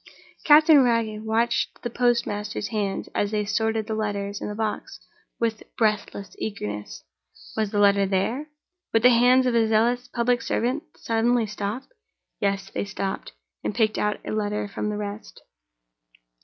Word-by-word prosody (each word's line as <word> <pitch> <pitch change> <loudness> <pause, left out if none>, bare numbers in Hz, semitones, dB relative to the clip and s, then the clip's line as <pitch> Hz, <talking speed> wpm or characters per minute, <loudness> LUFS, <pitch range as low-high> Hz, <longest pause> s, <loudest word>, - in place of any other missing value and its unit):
Captain 305 -1 +7
Wragge 230 -3 +1
watched 230 +2 0
the 240 - -2
postmaster's 220 -4 0
hands, 205 -3 -2
as 205 - 0
they 210 -1 -1
sorted 220 +1 0
the 220 - -3
letters 205 -2 -3
in - - -3
the 210 - -5
box, 220 -1 -3 0.4
with 225 -2 -1 0.2
breathless 210 -2 -1
eagerness. 105 - -5 0.5
Was 220 -2 0
the 205 - -3
letter 200 -1 +4
there? 225 +10 -1 0.4
Would 225 0 +3
the 250 - +9
hands 250 +2 +5
of 250 - +1
the 230 -1 +3
zealous 240 +3 +2
public 245 0 +1
servant 250 +7 -1 0.2
suddenly 230 +1 +1
stop? 210 +4 -4 0.6
Yes! 195 -1 -1
They - - -2
stopped, 195 - -4 0.3
and - - -2
picked 220 -2 +1
out 210 0 0
a - - -4
letter 210 -1 -1
from 210 +1 -3
the 210 - -3
rest. 205 +1 -7
215 Hz, 155 wpm, -25 LUFS, 205-235 Hz, 0.6 s, the